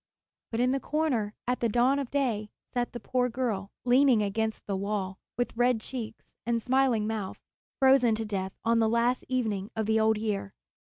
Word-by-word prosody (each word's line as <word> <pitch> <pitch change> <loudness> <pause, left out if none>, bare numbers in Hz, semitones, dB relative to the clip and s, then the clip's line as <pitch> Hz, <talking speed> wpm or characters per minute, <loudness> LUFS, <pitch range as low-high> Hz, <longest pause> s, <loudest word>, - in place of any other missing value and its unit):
But 225 - -3
in 250 +1 +3
the 275 - +1
corner, 265 -9 -1
at 250 0 0
the 235 - +1
dawn 245 +5 +3
of 275 -3 -3
day, 235 -7 -1 0.2
sat 245 -1 -1
the 240 - -6
poor 250 0 0
girl, 225 -6 -2 0.2
leaning 250 -3 +5
against 220 +2 -2
the 200 - -2
wall, 195 -1 -3 0.2
with 245 -1 -1
red 245 0 +3
cheeks 225 -1 -7
and 235 0 0
smiling 255 -2 +2
mouth, 215 -3 -3 0.4
frozen 265 -4 +5
to 220 0 -3
death 190 -2 -3
on 230 0 +3
the 220 -1 +3
last 235 +2 +1
evening 220 -6 -1
of 220 -1 -1
the 220 +1 +2
old 220 0 +3
year. 205 -2 -3
230 Hz, 185 wpm, -28 LUFS, 215-250 Hz, 0.4 s, leaning